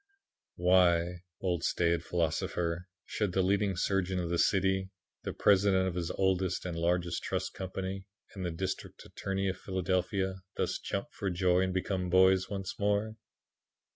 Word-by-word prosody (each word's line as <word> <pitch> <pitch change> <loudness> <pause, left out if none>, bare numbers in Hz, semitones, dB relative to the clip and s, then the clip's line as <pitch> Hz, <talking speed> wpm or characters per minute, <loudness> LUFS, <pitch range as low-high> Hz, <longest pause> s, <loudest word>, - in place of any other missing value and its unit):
Why, 90 -1 +3 0.2
old 90 -3 -1
staid 85 -1 +1
philosopher, 85 +1 -1 0.2
should 105 -4 -2
the 95 - +2
leading 100 +1 +2
surgeon 95 0 0
of 85 -1 -2
the 85 - +1
city, 95 -1 +2 0.3
the - - -4
president 95 -2 +3
of 90 - -3
its 85 -2 -2
oldest 95 -2 +1
and 90 -2 -3
largest 85 0 0
trust - - -2
company, 95 +1 -5 0.3
and 95 - -6
the 90 - -1
district 85 +3 -5
attorney 95 0 -3
of 95 -1 -2
Philadelphia, 95 +1 -1 0.2
thus - - -1
jump 100 - -3
for 100 - -3
joy 90 0 +2
and 95 0 +1
become 95 -1 -1
boys 95 +1 +5
once 95 -2 -5
more? 105 +2 +1
95 Hz, 150 wpm, -31 LUFS, 90-95 Hz, 0.3 s, boys